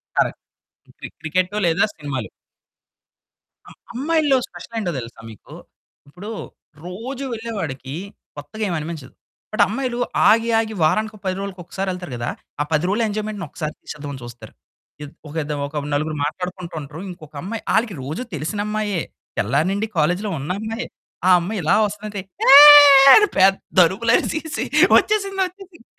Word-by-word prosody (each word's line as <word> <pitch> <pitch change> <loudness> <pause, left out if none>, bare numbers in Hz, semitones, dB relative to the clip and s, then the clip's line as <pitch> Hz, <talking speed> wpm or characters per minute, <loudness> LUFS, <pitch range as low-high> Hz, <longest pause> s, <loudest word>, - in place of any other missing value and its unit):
Correct. - - 0 0.6
క్రి - - -8
cricket 185 +5 -1
లేదా 165 -1 +2
సినిమాలు. 140 -6 -5 1.4
అ - - -14 0.2
అమ్మాయిల్లో 290 +1 +1
స్పెషల్ 175 +6 -12
ఏంటో 180 -5 -2
తెలుసా 115 -1 -10
మీకు! 105 - -15 0.5
ఇప్పుడు 180 +9 -10 0.6
రోజు 245 +9 -6
వెళ్ళేవాడికి 160 - -5 0.4
కొత్తగా 215 +9 -7
ఏమనిపించదు. 155 -4 -5 0.4
బట్ 215 - +4
అమ్మాయిలు 245 +2 -3 0.3
ఆగి, 230 +1 +3
ఆగి 220 -1 -3
వారానికో, 215 +7 0
10 185 -1 -1
రోలుకో 195 -2 -6
ఒక్కసారెళ్తారు 185 -4 -5
గదా! 120 0 -3 0.3
ఆ - - +2
10 155 +3 +1
రోజుల 215 +4 0
ఎంజాయ్‌మెంట్‌ని 210 -2 -4
ఒక్కసారి 155 -2 -5
ఇచ్చేద్దామని 145 -3 -8
చూస్తారు. 120 -2 -11 0.5
ఇద్ 145 - -9 0.2
ఒకిదొక 145 -1 -3
నలుగురు 155 +1 -1
మాట్లాడుకుంటూ 180 +2 -6
ఉంటరు. 150 +3 -10
ఇంకొక 155 -4 -12
అమ్మాయి 215 +5 -5
ఆళ్ళకి 220 -4 +1
రోజు 150 - -5
తెలిసినమ్మాయే. 205 +4 -2 0.4
తెల్లారి 140 - +1
నుండి 205 +3 -2
కాలేజ్‌లో 180 +7 +1
ఉన్న 145 +6 -4
అమ్మాయే. 225 +2 -5 0.4
ఆ - - +5
అమ్మాయి 195 +4 -4
ఇలా 175 +6 +3
వస్తుంటే 210 0 -7 0.3
ఏ - - +10 0.6
అని 420 -1 +6
పేద్దరుపులు 195 +2 +3
అరిసేసి 315 0 -2 0.3
వచ్చేసింది, 395 -2 +1
వచ్చేసింది. 365 -6 -13
185 Hz, 130 wpm, -21 LUFS, 155-220 Hz, 1.4 s, ఏ